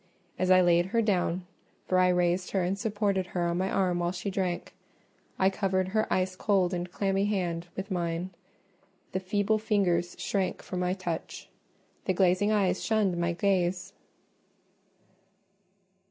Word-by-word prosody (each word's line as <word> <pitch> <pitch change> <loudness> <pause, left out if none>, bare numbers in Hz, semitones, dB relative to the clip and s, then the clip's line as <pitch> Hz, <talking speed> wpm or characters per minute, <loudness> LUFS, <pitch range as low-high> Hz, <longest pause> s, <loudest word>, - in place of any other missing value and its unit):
As 185 0 +1
I 185 0 +7
laid 175 0 +3
her 230 +4 +1
down—for 185 -1 -2
I 185 - +5
raised 180 0 +1
her 190 -2 +2
and 180 +2 0
supported 200 -3 -1
her 175 - +1
on 170 +1 0
my 190 +1 0
arm 180 -3 +1
while 175 0 0
she 190 +2 -4
drank—I 190 0 -3
covered 190 -1 0
her 215 +2 0
ice 185 0 +1
cold 190 -2 +1
and 175 0 -3
clammy 195 0 0
hand 175 -4 -1
with 195 +2 -5
mine: 170 0 -2 0.8
the 185 - -1
feeble 205 +3 0
fingers 190 -5 +1
shrank 195 -2 -2
from 180 - -4
my 180 0 0
touch—the 185 +1 -6
glazing 190 +3 +3
eyes 205 -3 +1
shunned 210 -5 +1
my 170 0 0
gaze. 185 0 0
185 Hz, 140 wpm, -28 LUFS, 175-195 Hz, 0.8 s, I